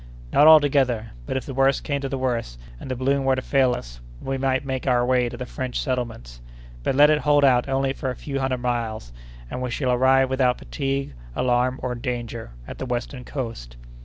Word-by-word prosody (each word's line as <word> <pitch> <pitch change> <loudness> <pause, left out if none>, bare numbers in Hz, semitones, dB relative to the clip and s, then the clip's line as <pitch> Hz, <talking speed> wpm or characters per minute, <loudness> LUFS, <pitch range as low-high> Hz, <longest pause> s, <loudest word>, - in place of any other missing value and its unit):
"Not 150 - +6
altogether; 135 -7 +5 0.2
but, - - -1
if 130 - -4
the 135 - -6
worst 135 +1 +2
came 140 -1 -2
to 135 - -3
the 135 - -2
worst, 120 - -2 0.2
and - - -9
the 130 - -1
balloon 135 +2 +1
were 135 0 +3
to 130 - -2
fail 130 -3 +2
us, - - -9 0.2
we 135 - -3
might 130 0 0
make 130 0 -3
our 120 -1 +3
way 125 -1 +2
to - - -8
the 125 - -5
French 125 0 -4
settlements. 115 - -4 0.4
But, 130 - -1
let 145 +2 +7
it 150 - +3
hold 145 -1 +4
out 125 -1 +3
only 135 0 +1
for 135 - -4
a 125 - -3
few 140 +1 -4
hundred 130 -2 -1
miles, 115 - -3 0.4
and 125 - -4
we 125 - -2
shall 125 +1 -1
arrive 130 +1 +4
without 130 -1 +1
fatigue, 135 - -3 0.2
alarm, 125 +1 +1
or 125 - -1
danger, 120 - -5 0.2
at - - -8
the 130 - -4
western 125 +1 -4
coast." 115 - -6
130 Hz, 215 wpm, -23 LUFS, 120-135 Hz, 0.4 s, let